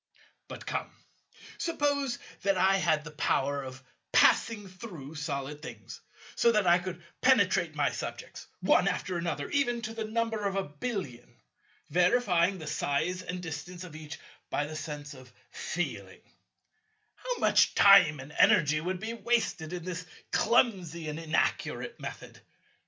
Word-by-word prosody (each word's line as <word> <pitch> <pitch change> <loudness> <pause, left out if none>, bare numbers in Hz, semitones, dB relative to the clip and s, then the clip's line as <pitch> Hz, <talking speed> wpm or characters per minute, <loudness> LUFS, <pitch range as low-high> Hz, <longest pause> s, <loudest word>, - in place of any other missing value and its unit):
But - - -9
come, - - -3 0.7
suppose 285 -6 0 0.2
that 195 -1 +2
I 195 +1 +4
had 160 -5 +1
the 155 - -9
power 140 -1 0
of 130 0 -9 0.3
passing 215 -3 +4
through 185 - -9
solid 150 -1 -4
things, 160 - -9 0.3
so 235 - +4
that 210 -2 +2
I 175 0 +5
could 175 -1 -7 0.2
penetrate 190 -10 +3
my 145 -4 +1
subjects, 120 - -7
one - - +4
after 185 - -1
another, 170 0 -2
even 245 -4 +1
to 225 -1 -4
the 225 -1 -4
number 225 -1 -1
of 195 - -3
a 195 - +1
billion, 145 - -5 0.6
verifying 180 0 +3
the 160 - -8
size 155 +5 -1
and 180 0 -6
distance 170 +3 -6
of 170 -4 -10
each 155 -2 -8 0.3
by 145 - 0
the 155 +1 -7
sense 150 -1 -6
of 130 -2 -14 0.2
feeling: - - -4 0.9
How - - -4
much - - +3
time 195 -8 +7
and 135 +3 -9
energy 150 +1 +5
would 180 +2 -3
be 220 +4 -4
wasted 225 -8 -1
in 175 -2 -5
this 180 -1 -5 0.2
clumsy 185 -9 +2
and 150 +1 -5
inaccurate 160 -1 -1
method! - - -8
175 Hz, 145 wpm, -29 LUFS, 150-205 Hz, 0.9 s, time